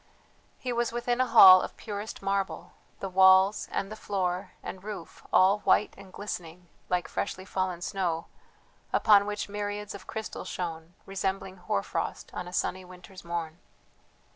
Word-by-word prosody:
He 250 -1 -3
was 235 0 0
within 240 +1 0
a 255 - +2
hall 190 -6 +10
of - - -6
purest 210 0 -6
marble, 195 0 -2 0.3
the 195 - -2
walls, 190 +2 +5
and 200 +2 -3
floor, 190 -3 -2
and 190 - -7
roof 205 -5 -8
all 195 +3 +5
white 210 - +2
and 195 -1 -14
glistening 180 -3 -7 0.2
like 180 -1 0
freshly 185 -1 -4
fallen 185 -3 -2
snow, 175 -4 -2 0.7
upon 205 -2 +5
which 210 0 -3
myriads 205 0 -4
of 200 - -11
crystals 220 -4 -6
shone, 165 -2 -5
resembling 195 0 -3
hoar 140 - -1
frost - - -4
on 180 - -5
a - - -8
sunny 185 +1 -1
winter's 180 +1 -13
morn. 170 -1 -4
190 Hz, 150 wpm, -28 LUFS, 180-205 Hz, 0.7 s, hall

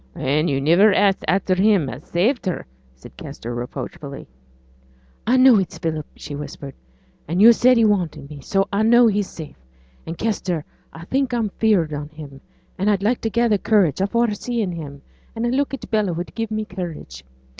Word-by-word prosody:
'An' 150 +5 0
yo' 140 - 0
niver 170 +10 +4
ax 195 -2 +3
at 170 - +3
after 185 - +3
him 190 -4 +3
as 130 +3 -7
saved 215 +6 0
her,' 180 - -3 0.3
said 65 - -15
Kester, 120 +1 -7
reproachfully. 140 +4 -7 1.0
'I 250 +3 +4
know 255 -4 +7
it's 185 -3 -4
Philip,' 160 -3 -3
she 150 - -9
whispered, 145 -1 -7 0.5
'and 170 +4 -1
yo' 225 +4 +9
said 250 +2 +4
he 230 - +4
wanted 180 -9 0
me; 145 -1 -10
so 195 +8 0
I 200 - +1
know 235 +2 +5
he's 205 -3 +1
safe; 150 - -11 0.4
and, 165 +1 -5
Kester, 185 -7 -2 0.3
I 165 +1 -11
think 265 +3 -1
I'm 225 -3 0
'feared 195 -7 +1
on 145 0 -5
him, 145 -3 -11 0.4
and 200 +3 +1
I'd 200 -2 +1
like 230 +4 +1
to 225 - -1
gather 235 -2 +2
courage 190 -7 +2
afore 235 +3 +1
seeing 220 -2 -3
him, 145 -4 -8 0.3
and 230 +1 -2
a - - +1
look 275 +3 0
at 275 - -7
Bella 210 -5 +1
would 175 +2 -6
give 225 -1 -3
me 215 0 -3
courage. 170 - -7
190 Hz, 190 wpm, -21 LUFS, 155-220 Hz, 1.0 s, yo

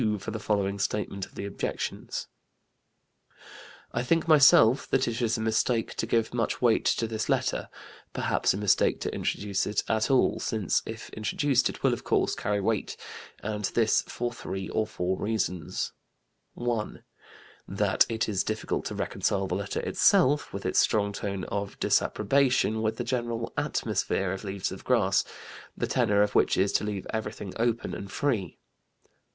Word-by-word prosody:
for 100 - -6
the 110 - -4
following 100 -2 0
statement 100 -1 -2
of - - -23
the - - -5
objections: 100 - -4 1.7
"I 120 - 0
think 165 +7 +1
myself 140 -5 +6
that 135 0 +1
it 115 +1 -2
is 115 -1 +1
a - - -3
mistake 110 +1 +1
to 115 - -1
give 115 0 +1
much 115 -2 -1
weight 120 -3 +3
to 115 - +2
this 110 -1 -3
letter - - 0 0.4
perhaps - - +1
a - - -1
mistake 105 -1 +2
to - - -2
introduce 100 -2 -1
it 105 - 0
at 110 -1 +1
all, 135 -2 +3
since 110 -6 0
if 110 +1 -7
introduced 125 +4 +1
it - - -9
will, - - +4
of - - -5
course, - - +1
carry 105 0 -1
weight. 105 +1 -1 0.5
And 105 -1 -2
this 110 +2 +2
for 120 0 -3
three 95 -5 -5
or 110 -1 0
four 95 -2 -2
reasons: 90 -7 -2 0.6
"1. 120 -3 -3 0.6
That - - +2
it 110 -1 -1
is 100 -4 0
difficult 110 0 -2
to - - -4
reconcile 95 -1 -1
the 95 - -3
letter 95 +1 -2
itself 145 +3 +3
(with - - -6
its - - +2
strong 100 -1 +2
tone 100 -2 -4
of 100 -1 -4
disapprobation) 125 -1 +2
with 110 0 -1
the - - -2
general 120 -2 -2
'atmosphere' 95 -2 -1
of 95 - -6
Leaves 100 -1 -3
of 95 - -8
Grass, 105 -6 +3 0.5
the - - 0
tenor 100 0 +3
of 105 - -1
which - - +3
is 95 +1 +2
to - - +2
leave 105 -2 -3
everything 105 -3 -4
open 115 0 0
and 100 0 -7
free. 115 - -1
110 Hz, 165 wpm, -28 LUFS, 100-115 Hz, 1.7 s, myself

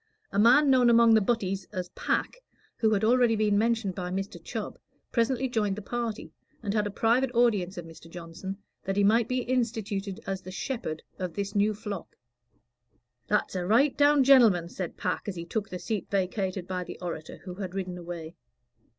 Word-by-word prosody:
A 200 - 0
man 260 +6 +6
known 250 -2 +5
among 230 -1 +6
the 220 - +5
"butties" 195 -3 -1
as 185 -3 -4
Pack, - - -2 0.4
who 220 -2 +2
had 200 - -1
already 240 0 +4
been 210 -1 +2
mentioned 220 -2 +1
by 180 -1 -4
Mr. 195 +2 -4
Chubb, - - -5 0.3
presently 255 +2 +1
joined 210 -5 0
the 215 - -6
party, 235 -1 -4 0.3
and 200 -2 -1
had 210 -1 +1
a - - -3
private 235 +5 +2
audience 205 -6 +2
of 175 - -6
Mr. 165 0 -13
Johnson, 175 +3 -7 0.3
that 195 -1 -1
he 205 - +4
might 225 +3 +4
be 255 0 0
instituted 220 -5 -2
as 195 -1 -3
the 185 - -10
"shepherd" 200 - -4 0.2
of 180 -3 -4
this 200 0 -3
new 210 +1 +2
flock. 205 -4 -7 1.1
"That's 210 - +1
a 180 -2 -2
right 260 +7 +4
down 290 -1 +5
genelman," 225 -11 +5
said 180 -2 -6
Pack, - - -2
as 200 - -3
he 170 -1 -6
took 215 +3 -3
the 180 - -5
seat 210 0 -4
vacated 190 -1 -1
by 185 -1 -3
the - - -9
orator, 165 -3 -6
who 185 - -7
had 185 -1 -6
ridden 180 -2 -4
away. 170 -2 -7
205 Hz, 190 wpm, -28 LUFS, 185-230 Hz, 1.1 s, man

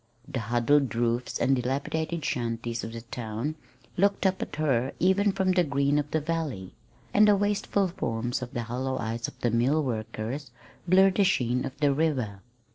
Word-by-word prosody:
The 125 - -3
huddled 120 +4 +2
roofs 120 +1 0
and 135 - +3
dilapidated 140 +6 -2
shanties 115 -1 -2
of 115 - -5
the 115 - -6
town 115 +4 -4 0.4
looked 200 +2 +2
up 190 0 +2
at - - -4
her 135 -4 +1
even 195 +3 +3
from 190 -1 +1
the 180 -1 +3
green 140 -1 +1
of 145 0 -3
the 160 - +1
valley; 150 - -3 0.4
and 210 +1 +6
the 205 - +6
wasted 200 -1 0
forms 120 +3 -2
and 125 -1 -6
hollow 125 +3 -2
eyes 115 0 -3
of - - -12
the 120 - +1
mill 130 +7 +2
workers 115 +3 -4 0.4
blurred 190 +1 +5
the 200 - +5
sheen 125 -9 +1
of 135 0 -7
the 145 -1 +4
river. 130 -10 -1
135 Hz, 175 wpm, -27 LUFS, 115-165 Hz, 0.4 s, and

